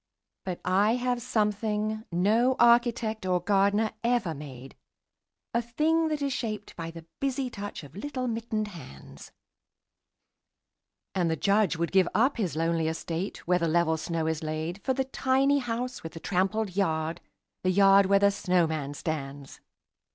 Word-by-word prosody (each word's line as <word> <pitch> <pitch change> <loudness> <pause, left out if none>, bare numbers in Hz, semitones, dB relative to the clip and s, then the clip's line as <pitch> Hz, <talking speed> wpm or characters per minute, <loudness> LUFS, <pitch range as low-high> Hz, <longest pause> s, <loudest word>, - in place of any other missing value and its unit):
But 180 -2 -4
I 205 +5 +3
have 250 -1 -1
something 215 -1 -1
no 220 +9 +3
architect 235 -2 +3
or 180 -1 +1
gardener 200 +3 +2
ever 235 -8 +1
made, 135 -3 -10 0.8
A 235 - +2
thing 315 +7 +1
that 305 -2 -2
is 275 -1 0
shaped 215 -4 -4
by 165 -1 -5
the 165 -1 -10
busy 270 -2 -1
touch 205 -5 -6
of 145 0 -13
little 255 +3 -4
mittened 225 -2 -2
hands: 130 - -12 1.8
And 175 -3 +1
the 160 - +1
Judge 200 +2 +2
would 170 +1 -2
give 190 -2 +4
up 255 +5 +3
his 190 -9 -1
lonely 165 0 0
estate, 165 +3 -4
where 180 0 +3
the 170 - 0
level 160 0 +2
snow 160 0 -2
is 160 -1 -1
laid 155 +4 -4
For 260 - 0
the 265 0 0
tiny 270 +2 +2
house 245 0 -3
with 165 - -8
the 165 - -8
trampled 195 +2 -1
yard, 160 -4 0 0.4
the 185 - +2
yard 195 +1 +6
where 200 +1 +5
the 200 0 +4
snowman 160 -7 0
stands. 140 -3 -5
200 Hz, 155 wpm, -28 LUFS, 165-235 Hz, 1.8 s, yard